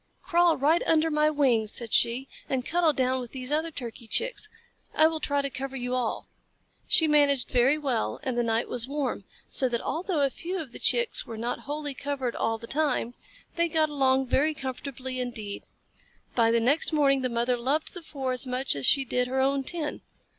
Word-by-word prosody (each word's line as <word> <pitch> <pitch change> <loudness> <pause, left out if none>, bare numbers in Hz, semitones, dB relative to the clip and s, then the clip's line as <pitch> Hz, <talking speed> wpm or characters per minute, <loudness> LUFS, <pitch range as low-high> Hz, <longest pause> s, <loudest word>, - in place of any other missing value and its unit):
"Crawl 345 -2 +3
right 305 +5 +3
under 320 0 +3
my 300 0 +3
wings," 250 -8 +2
said 235 -2 -4
she, 240 +3 +2 0.2
"and 260 -2 -1
cuddle 340 -1 +3
down 260 -2 0
with 245 -2 -8
these 260 0 -5
other 315 +2 +1
Turkey 240 -5 -8
Chicks. 470 - -1 0.5
I 310 - +6
will 320 0 +1
try 285 -2 0
to 275 - -1
cover 270 +1 -5
you 250 -1 -3
all." 250 -3 -2 0.6
She 320 - +6
managed 285 -3 +3
very 255 +4 +4
well 250 - -1
and 260 -2 -2
the 240 - +2
night 230 0 0
was 245 0 -4
warm, 275 -8 -3 0.2
so 260 - 0
that 235 -1 0
although 340 - -2
a 275 - -1
few 365 +6 -4
of 300 -7 -7
the - - -9
Chicks 480 -2 +1
were 225 - -7
not 240 +2 -3
wholly 295 -1 -3
covered 265 -3 -3
all 225 0 0
the 230 - -10
time, 270 -3 -1 0.4
they 340 0 +3
got 315 -1 +2
along 265 -2 +2
very 295 +5 +1
comfortably 260 -1 -5
indeed. 220 -5 -5 0.7
By 230 -2 +3
the 230 0 +3
next 275 +10 +2
morning 275 -3 +3
the 255 - 0
mother 240 +1 +1
loved 270 +6 -1
the 355 - -8
four 275 -5 -4
as 255 +1 0
much 255 - -1
as 140 -2 -2
she 275 -1 +4
did 250 0 0
her 265 +1 -1
own 270 +1 +2
ten. 315 +1 -3
270 Hz, 205 wpm, -27 LUFS, 245-300 Hz, 0.7 s, I